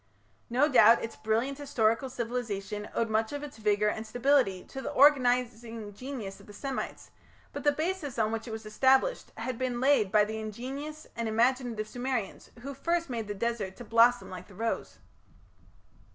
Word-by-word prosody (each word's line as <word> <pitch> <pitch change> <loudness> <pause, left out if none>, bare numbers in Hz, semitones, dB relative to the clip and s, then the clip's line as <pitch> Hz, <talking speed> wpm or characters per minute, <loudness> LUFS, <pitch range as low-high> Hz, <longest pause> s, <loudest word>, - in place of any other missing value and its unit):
No 260 +5 +3
doubt 235 -5 +6
its 225 - -5
brilliant 235 +6 -1
historical 235 -3 +1
civilization 220 -4 -4
owed 230 - +1
much 220 0 0
of 290 0 -5
its 290 -6 -8
vigour 210 -1 +2
and 220 +1 -2
stability 245 -5 +2
to 270 - -8
the - - -4
organizing 245 -5 +2
genius 235 -4 -6
of - - -16
the 205 - -11
Semites, 270 +4 -5 0.4
but - - -5
the 290 - +5
basis 310 -2 -3
on 220 -1 +1
which 225 +1 -4
it - - -6
was 220 0 -6
established 265 - +2
had 235 +2 -4
been 250 -2 -1
laid 255 -7 +3
by 210 0 +5
the 220 +1 -4
ingenious 270 +8 -6
and 230 -1 -2
imaginative 235 -1 +1
Sumerians 245 -2 -3
who 280 +3 -6
first 335 +2 -1
made 225 -3 -3
the 205 - -4
desert 210 -3 -2
to 245 - -9
blossom 235 +1 +4
like 185 -1 -8
the 200 - -15
rose. 225 +3 -3
235 Hz, 175 wpm, -29 LUFS, 220-265 Hz, 0.4 s, doubt